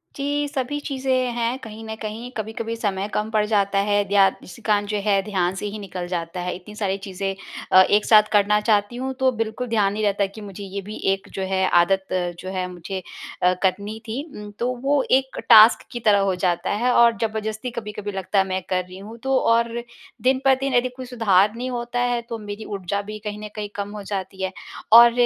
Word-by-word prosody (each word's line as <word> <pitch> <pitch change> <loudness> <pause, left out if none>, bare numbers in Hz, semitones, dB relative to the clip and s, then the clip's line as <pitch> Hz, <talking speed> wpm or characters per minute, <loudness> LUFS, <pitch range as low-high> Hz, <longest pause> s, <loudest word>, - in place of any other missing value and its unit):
जी, 290 0 -1
सभी 285 0 -3
चीज़ें 260 -3 -1
हैं 235 +1 -1
कहीं 225 -2 -9
न 220 0 -5
कहीं 220 +3 -5
कभी-कभी 225 +1 -4
समय 200 -3 -2
कम 215 +1 -1
पड़ 215 -1 +2
जाता 200 -2 +2
है। 205 0 +3
ध्या 200 -1 +5 0.2
उसी 175 - -12
कारण 205 -1 +1
जो 210 0 -1
है 200 -2 +3
ध्यान 190 -3 -1
से 195 - -5
ही 210 +1 -6
निकल 185 -3 -6
जाता 175 0 -4
है 180 0 -2
इतनी 190 +4 -11
सारी 195 -2 -1
चीज़ें 195 0 -3 0.4
अ, 185 - +9
एक 205 +2 +3
साथ 215 -1 +7
करना 210 0 +4
चाहती 210 +1 +1
हूँ 260 +2 -3
तो 260 0 +3
बिल्कुल 225 +2 -2
ध्यान 210 -4 +2
नहीं 215 +1 -2
रहता 200 -1 +2
कि 200 +3 -10
मुझे 200 -1 -8
ये 200 0 -5
भी 210 +2 -8 0.2
एक 195 - -7
जो 195 - -4
है 190 0 +2
आदत 190 +2 +2 0.3
जो 185 - -6
है 185 -1 -2
मुझे 185 +2 -6 0.4
अ, 180 0 +5
करनी 200 +3 0
थी 230 +5 -3 0.2
उम, 210 0 -9
तो 245 +2 0
वो 280 0 +3
एक 265 0 +2
टास्क 220 -1 +8
की 240 - -4
तरह 210 -3 +4
हो 195 -1 +1
जाता 180 -1 0
है 250 - +3
और 235 -1 +5
जबरदस्ती 220 +2 -2
कभी-कभी 210 -1 -6
लगता 195 +1 -1
है 190 - +3
मैं 190 0 -2
कर 185 -1 +1
रही 180 +1 -12
हूँ, 210 +4 -10
तो 265 +3 0
और 230 -1 +2 0.5
दिन 260 +1 +2
प 270 - +7
दिन 270 -1 -1
यदि 245 +1 +3
कोई 260 0 -7
सुधार 210 -5 +3
नहीं 250 +2 -4
होता 240 0 -3
है 245 -1 +1
तो 230 - -3
मेरी 205 +1 -7
ऊर्जा 200 0 -3
भी 215 +1 -7
कहीं 210 0 -4
न - - -4
कहीं 210 -1 -4
कम 200 0 -3
हो 205 - -6
जाती 195 -1 -5
है। 190 - -1 0.4
और 235 +1 +10
210 Hz, 225 wpm, -23 LUFS, 195-235 Hz, 0.5 s, और